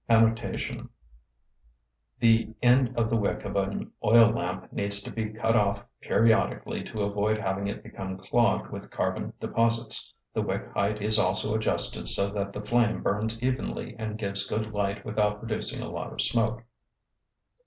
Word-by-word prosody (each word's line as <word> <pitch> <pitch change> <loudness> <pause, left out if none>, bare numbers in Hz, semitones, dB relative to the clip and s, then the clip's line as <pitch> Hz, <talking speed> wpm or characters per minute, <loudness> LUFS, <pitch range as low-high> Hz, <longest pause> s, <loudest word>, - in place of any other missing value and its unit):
{The 115 -1 +3
end 125 0 +4
of 115 -1 +1
the - - +3
wick 105 -3 -1
of 100 - -4
an 100 0 -2
oil 115 +1 +7
lamp - - -4
needs 100 0 0
to - - -7
be 110 -2 -3
cut 110 +1 0
off 100 -3 +1
periodically 115 0 +1
to 105 -2 -3
avoid 105 +2 +1
having 100 -1 -2
it 100 - -5
become 95 0 -6
clogged - - +1
with - - -8
carbon - - -2
deposits. 115 0 +1 0.2
The - - 0
wick - - -3
height 100 +1 0
is 110 0 +3
also 95 +3 +1
adjusted 85 - 0
so 100 +7 +3
that 100 -1 -3
the 105 - -6
flame 120 0 +2
burns 110 +3 -1
evenly 130 +1 -2
and 110 -1 -4
gives 100 -2 -2
good 110 0 -3
light 100 0 -2
without 105 -1 +1
producing 110 0 -3
a - - -6
lot - - -5
of - - -10
smoke. 115 0 +2
105 Hz, 155 wpm, -27 LUFS, 100-115 Hz, 0.2 s, oil